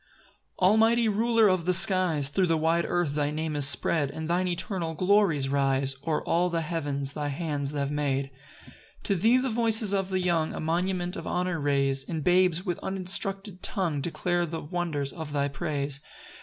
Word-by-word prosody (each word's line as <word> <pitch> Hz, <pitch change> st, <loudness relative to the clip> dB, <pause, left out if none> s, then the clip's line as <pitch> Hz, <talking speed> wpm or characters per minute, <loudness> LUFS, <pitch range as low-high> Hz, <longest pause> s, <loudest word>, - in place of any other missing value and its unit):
1 185 Hz, +1 st, +3 dB
Almighty 225 Hz, +2 st, +3 dB
Ruler 225 Hz, +1 st, +3 dB
of 185 Hz, -3 st, +1 dB
the 180 Hz, -, +2 dB
skies, 175 Hz, -6 st, +3 dB
Thro' 185 Hz, +5 st, +1 dB
the 165 Hz, -1 st, +1 dB
wide 165 Hz, +2 st, +1 dB
earth 175 Hz, -5 st, -1 dB
thy 145 Hz, -1 st, 0 dB
name 155 Hz, 0 st, -3 dB
is 145 Hz, -2 st, +4 dB
spread, 145 Hz, 0 st, +1 dB
And 160 Hz, +3 st, -6 dB
thine 180 Hz, +2 st, 0 dB
eternal 175 Hz, -2 st, -3 dB
glories 180 Hz, -6 st, +2 dB
rise 135 Hz, -1 st, +1 dB
O'er 155 Hz, -2 st, 0 dB
all 175 Hz, +2 st, +1 dB
the 165 Hz, -1 st, -1 dB
heavens 145 Hz, -4 st, -3 dB
thy 150 Hz, -1 st, -3 dB
hands 145 Hz, -1 st, -3 dB
have 140 Hz, -1 st, -2 dB
made. 140 Hz, -2 st, -1 dB, 0.7 s
2 -, -, 0 dB
To -, -, 0 dB
thee 230 Hz, +4 st, +5 dB
the 255 Hz, -1 st, -1 dB
voices 220 Hz, -2 st, +2 dB
of 195 Hz, -1 st, -1 dB
the 190 Hz, -1 st, -1 dB
young 170 Hz, -3 st, 0 dB
A -, -, -5 dB
monument 175 Hz, +3 st, -2 dB
of -, -, -7 dB
honour 180 Hz, -1 st, -1 dB
raise; 140 Hz, -2 st, +1 dB
And 160 Hz, -3 st, -3 dB
babes, 180 Hz, +1 st, +2 dB
with 175 Hz, -3 st, -3 dB
uninstructed 195 Hz, 0 st, -2 dB
tongue, 170 Hz, -8 st, +1 dB
Declare 175 Hz, +2 st, -1 dB
the 165 Hz, 0 st, -5 dB
wonders 150 Hz, -4 st, -3 dB
of 160 Hz, -3 st, -7 dB
thy 140 Hz, -1 st, 0 dB
praise. 140 Hz, -1 st, -2 dB
170 Hz, 185 wpm, -27 LUFS, 145-185 Hz, 0.7 s, thee